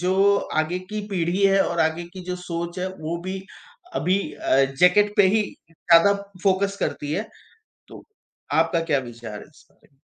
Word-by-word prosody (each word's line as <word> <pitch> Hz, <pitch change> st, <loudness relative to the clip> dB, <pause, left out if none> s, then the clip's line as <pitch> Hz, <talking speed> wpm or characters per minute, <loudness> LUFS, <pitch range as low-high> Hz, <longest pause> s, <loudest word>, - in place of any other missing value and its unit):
जो 195 Hz, +3 st, +3 dB, 0.3 s
आगे 175 Hz, +3 st, -3 dB
की 210 Hz, +3 st, -6 dB
पीढ़ी 185 Hz, 0 st, -1 dB
है 195 Hz, 0 st, +5 dB
और 170 Hz, -, -1 dB
आगे 160 Hz, +2 st, 0 dB
की 190 Hz, -, -8 dB
जो 180 Hz, 0 st, -4 dB
सोच 175 Hz, 0 st, -5 dB
है, 185 Hz, -, -2 dB
वो 170 Hz, -3 st, -5 dB
भी 190 Hz, +1 st, -4 dB, 0.5 s
अभी 185 Hz, -, +1 dB
अ, 135 Hz, -1 st, +2 dB
जैकेट 180 Hz, +9 st, +3 dB
पे 200 Hz, -, +6 dB
ही 215 Hz, -, +3 dB, 0.3 s
ज़्यादा 170 Hz, +4 st, +4 dB, 0.3 s
फोकस 200 Hz, 0 st, +1 dB
करती 145 Hz, 0 st, -2 dB
है, 210 Hz, +6 st, -2 dB, 0.6 s
तो -, -, -12 dB, 0.5 s
आपका 165 Hz, +1 st, +2 dB
क्या 150 Hz, -4 st, +1 dB
विचार 120 Hz, -4 st, -8 dB
है -, -, -11 dB
इसपे? 135 Hz, -3 st, -26 dB
180 Hz, 165 wpm, -23 LUFS, 160-195 Hz, 0.6 s, पे